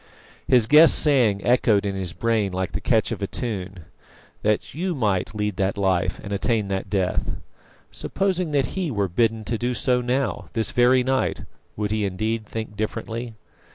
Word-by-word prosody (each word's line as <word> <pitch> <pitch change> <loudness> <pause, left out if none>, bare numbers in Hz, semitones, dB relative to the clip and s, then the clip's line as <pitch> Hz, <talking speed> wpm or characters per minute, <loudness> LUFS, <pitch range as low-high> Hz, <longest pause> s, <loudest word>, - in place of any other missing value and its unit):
His 125 -4 +5
guest's 150 +6 +7
saying 120 -10 +2
echoed 115 -4 +3
in 100 - -1
his 95 -3 -3
brain 105 +2 0
like 95 0 -2
the - - -4
catch - - +1
of - - -4
a - - -1
tune 95 -7 -5 0.6
"that 105 0 0
you 175 +3 -2
might 105 -4 -1
lead 105 -2 -2
that 95 0 0
life 95 -3 0
and 100 - -5
attain 105 0 0
that 95 0 -3
death." 95 -3 -1 0.6
Supposing 185 -3 -1
that 140 -4 0
he 185 -4 -1
were 100 -6 0
bidden 110 +4 0
so - - -6
to 115 - +1
do 125 +1 +1
now, 125 -4 -1
this 110 -1 +1
very 125 +1 +4
night, 130 +1 0 0.3
would 105 -1 -2
he 110 -1 0
indeed 110 +3 -2
"think 110 -1 -6
differently"? 110 +2 -4
110 Hz, 175 wpm, -23 LUFS, 100-125 Hz, 0.6 s, guest's